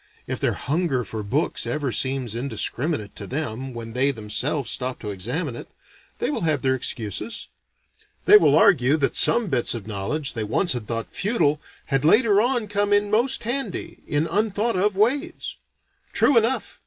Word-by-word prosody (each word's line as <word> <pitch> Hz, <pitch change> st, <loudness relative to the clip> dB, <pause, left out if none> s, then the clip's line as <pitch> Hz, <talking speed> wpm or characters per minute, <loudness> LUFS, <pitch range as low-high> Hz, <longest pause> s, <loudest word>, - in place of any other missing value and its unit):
If -, -, -4 dB
their -, -, +1 dB
hunger 145 Hz, -3 st, -1 dB
for 110 Hz, 0 st, -6 dB
books 125 Hz, +10 st, -1 dB
ever 145 Hz, -4 st, -2 dB
seems 130 Hz, 0 st, -1 dB
indiscriminate 120 Hz, 0 st, -2 dB
to 100 Hz, -, -5 dB
them 130 Hz, -1 st, -4 dB
when 115 Hz, -2 st, -7 dB
they 130 Hz, +3 st, +2 dB
themselves 120 Hz, +3 st, -1 dB
stop 130 Hz, 0 st, -1 dB
to 105 Hz, -, -4 dB
examine 120 Hz, -, -3 dB
it, -, -, -9 dB, 0.5 s
they -, -, -1 dB
will -, -, -3 dB
have 155 Hz, -5 st, 0 dB
their 130 Hz, -1 st, +2 dB
excuses. 130 Hz, -, -3 dB, 0.8 s
They 415 Hz, -, +8 dB
will 420 Hz, -, +6 dB
argue 145 Hz, -6 st, +4 dB
that 140 Hz, -3 st, 0 dB
some 235 Hz, 0 st, +4 dB
bits 130 Hz, -, 0 dB
of 110 Hz, -4 st, -7 dB
knowledge 110 Hz, +8 st, -3 dB
they 115 Hz, -4 st, -3 dB
once 155 Hz, -, +1 dB
had 120 Hz, -4 st, -5 dB
thought 115 Hz, -1 st, -3 dB
futile, 155 Hz, -9 st, +1 dB, 0.2 s
had 135 Hz, -1 st, 0 dB
later 210 Hz, +4 st, +5 dB
on 240 Hz, -2 st, 0 dB
come 205 Hz, 0 st, 0 dB
in 205 Hz, 0 st, +2 dB
most 240 Hz, +5 st, +2 dB
handy, 260 Hz, +4 st, -4 dB
in 145 Hz, +2 st, 0 dB
unthought 215 Hz, +3 st, 0 dB
of 200 Hz, +2 st, +1 dB
ways. 275 Hz, -, -1 dB, 0.6 s
True 285 Hz, -, +3 dB
enough! 230 Hz, +3 st, +1 dB
145 Hz, 170 wpm, -23 LUFS, -, 0.8 s, They